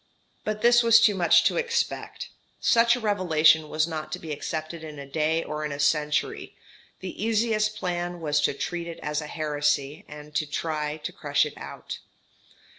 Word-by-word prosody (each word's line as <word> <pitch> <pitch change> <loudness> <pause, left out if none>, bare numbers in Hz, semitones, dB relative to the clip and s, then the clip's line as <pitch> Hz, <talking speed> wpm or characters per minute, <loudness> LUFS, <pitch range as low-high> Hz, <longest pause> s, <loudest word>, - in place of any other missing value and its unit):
But 215 0 -3
this 240 0 +6
was 230 -1 +7
too 220 -2 +5
much 175 -3 +4
to - - +2
expect. 470 0 -2 0.3
Such 235 0 +4
a - - -4
revelation 160 -7 +3
was 155 +1 +1
not 155 -2 -5
to - - -2
be 160 - -8
accepted 155 +2 -5
in 155 -2 -8
a 140 - -7
day 155 +3 0
or 150 0 -4
in 150 - -3
a 140 - -4
century 150 +1 0 0.5
the 190 +2 -6
easiest 215 -1 +1
plan 175 -3 -3
was 150 -2 +1
to 140 - +1
treat 170 +4 -4
it 170 - -7
as 150 +1 -1
a 150 - -7
heresy, 150 -2 -1
and 150 0 -11 0.2
try 150 -1 -2
to 150 - -6
crush 145 0 +1
it 150 - -7
out. - - -8
160 Hz, 180 wpm, -26 LUFS, 150-205 Hz, 0.5 s, was